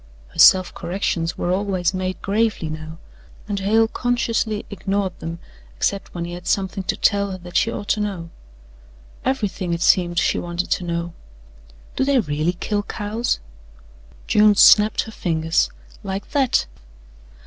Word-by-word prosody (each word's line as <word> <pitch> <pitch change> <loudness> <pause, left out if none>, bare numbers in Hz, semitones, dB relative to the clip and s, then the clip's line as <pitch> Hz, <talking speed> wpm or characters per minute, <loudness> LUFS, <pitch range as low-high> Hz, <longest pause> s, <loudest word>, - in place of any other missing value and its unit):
Her - - -12
self 185 -1 +7
corrections 175 -2 -2
were 175 - -1
always 190 -2 0
made 185 0 -3
gravely 210 -5 0
now, 155 +1 -7 0.5
and 205 -1 -2
Hale 220 +3 +3
consciously 230 -3 -1
ignored 195 -2 -2
them 165 +1 -5 0.4
except 195 - -1
when 170 -1 -3
he 175 - -6
had 175 0 -8
something 195 0 0
to - - -1
tell 200 -1 +2
her 190 - -5
that 175 -1 -12
she 230 - +3
ought 205 - -6
to 210 - +2
know. 190 -5 -4 0.9
Everything, 205 -9 -1
it 170 - -6
seemed, 175 -2 +3
she - - +2
wanted 175 +1 -4
to - - +1
know. 170 0 -3 0.8
"Do - - +1
they 275 0 +3
really 155 -3 0
kill 205 +3 -2
cows?" 215 +3 -2 0.9
June 210 -1 +5
snapped 210 +1 +6
her 220 - -8
fingers: 165 -4 0 0.3
"Like 195 0 -5
that. 275 -4 +2
195 Hz, 150 wpm, -21 LUFS, 175-210 Hz, 0.9 s, self